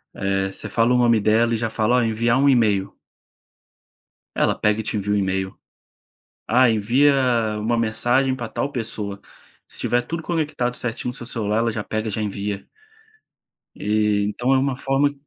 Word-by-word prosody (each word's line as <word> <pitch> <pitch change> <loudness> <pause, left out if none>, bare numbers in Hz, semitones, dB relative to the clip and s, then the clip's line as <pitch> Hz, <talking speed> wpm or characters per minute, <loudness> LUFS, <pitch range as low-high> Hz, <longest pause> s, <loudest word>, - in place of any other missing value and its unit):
eh, 95 0 -1
você 110 - -8
fala 115 +3 +2
o - - +4
nome 120 -2 +4
dela 110 +3 +2
e - - +1
já 115 0 -2
fala: 110 +2 +1
"Olha 120 - +2
enviar 115 +2 +1
um 140 - +4
email." 110 -7 +2 1.4
Ela - - +2
pega 105 +1 +1
e - - -2
te 110 - -3
envia 105 0 -1
um - - +2
email. 95 -1 -2 0.9
Ah, 125 +2 +5
envia 120 +7 +3 0.5
uma 115 +3 0
mensagem 120 +4 +1
para 120 -3 -6
tal 140 - -3
pessoa 105 -5 -4 0.4
se - - -10
tiver 120 0 +1
tudo 165 +7 -5
conectado 150 -7 -2
certinho 125 0 -4
no - - -5
seu 120 - -8
celular 110 -3 -1
ela 115 0 +1
já 105 -1 -4
pega 110 +1 -3
e - - -5
já 110 - -3
envia. 100 -1 -4 1.1
E 105 -1 +1
então 120 +5 0
é - - +4
uma 135 0 0
forma 135 +2 +1
115 Hz, 180 wpm, -22 LUFS, 105-125 Hz, 1.4 s, Ah